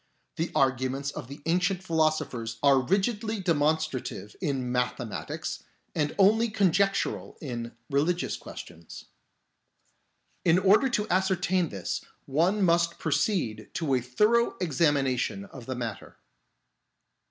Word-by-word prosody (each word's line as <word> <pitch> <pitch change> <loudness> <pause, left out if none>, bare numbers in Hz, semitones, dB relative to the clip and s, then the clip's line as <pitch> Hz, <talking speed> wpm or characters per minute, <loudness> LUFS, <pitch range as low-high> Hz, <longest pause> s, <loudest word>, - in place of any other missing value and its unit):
The 165 +2 -1
arguments 130 +1 +1
of 120 - -7
the 140 +2 -10
ancient 180 +3 +1
philo 160 -3 +3
sophers 115 -7 -5
are 140 -2 +6
rigidly 210 - 0
demonstrative 155 - -1
in 135 -7 -1
mathematics 125 -2 -3 0.3
and 150 -1 -1
only 220 +4 +4
conjectural 200 -1 +1
in 120 -5 -5
religious 160 +6 0
questions. 85 -1 -10 1.4
In 170 0 +5
order 200 +8 +4
to 210 -3 0
ascertain 185 -2 +1
this 95 -3 -4 0.2
one 175 +9 +2
must 170 -1 +2
proceed 145 - -1
to 155 -5 0
a 125 - +2
thorough 215 - +2
examination 145 +1 +1
of 135 -11 -12
the 130 - -3
matter." 115 -4 -6
155 Hz, 115 wpm, -28 LUFS, 130-190 Hz, 1.4 s, are